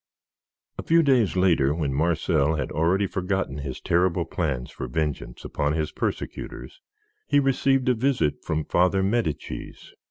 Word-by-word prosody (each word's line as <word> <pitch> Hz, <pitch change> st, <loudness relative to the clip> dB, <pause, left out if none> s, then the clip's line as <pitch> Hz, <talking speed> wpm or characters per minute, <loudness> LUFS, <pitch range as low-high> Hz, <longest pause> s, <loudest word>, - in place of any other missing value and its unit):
A -, -, 0 dB
few 165 Hz, 0 st, +4 dB
days 125 Hz, -, +3 dB
later, 85 Hz, -7 st, +3 dB
when 75 Hz, -5 st, -1 dB
Marcel 80 Hz, 0 st, +1 dB
had 75 Hz, -, -3 dB
already 90 Hz, +6 st, +2 dB
forgotten 95 Hz, -6 st, -2 dB
his 70 Hz, -3 st, -5 dB
terrible 85 Hz, 0 st, +1 dB
plans 65 Hz, -8 st, -3 dB
for -, -, -6 dB
vengeance 75 Hz, -2 st, -3 dB
upon 75 Hz, +1 st, -1 dB
his 80 Hz, -1 st, -1 dB
persecutors, -, -, -5 dB, 0.5 s
he 145 Hz, -, +4 dB
received 135 Hz, -1 st, +2 dB
a 125 Hz, -, +5 dB
visit 125 Hz, -, 0 dB
from 80 Hz, -1 st, -2 dB
Father 90 Hz, +2 st, +2 dB
Medicis. 100 Hz, -5 st, -3 dB
85 Hz, 145 wpm, -25 LUFS, 75-105 Hz, 0.5 s, a